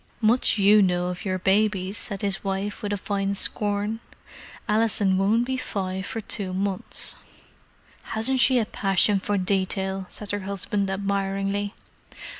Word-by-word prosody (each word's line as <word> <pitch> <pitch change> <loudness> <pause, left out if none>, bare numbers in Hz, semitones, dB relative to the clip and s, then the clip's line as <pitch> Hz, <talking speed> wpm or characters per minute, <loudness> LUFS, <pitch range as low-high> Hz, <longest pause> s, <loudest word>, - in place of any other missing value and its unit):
"Much 230 +1 +3
you 205 +1 +6
know 180 -2 +1
of 180 +1 -6
your 185 -1 0
babies!" 195 0 +1
said 200 -1 -2
his 200 0 0
wife, 195 +1 -3
with 205 - -3
a 205 - 0
fine 200 0 -2
scorn. 205 +2 0 0.7
"Alison 210 -3 +2
won't 210 +5 +2
be 260 +1 -2
five 190 -5 -3
for 225 - -4
two 195 -3 -2
months." 195 0 0 1.0
"Hasn't 255 +4 +2
she 255 +1 +5
a 230 - +2
passion 195 0 +2
for 205 +1 -1
detail!" 190 0 -1
said 210 -1 -4
her 205 - -1
husband 200 0 -2
admiringly. 195 +1 -2
200 Hz, 145 wpm, -25 LUFS, 190-210 Hz, 1.0 s, you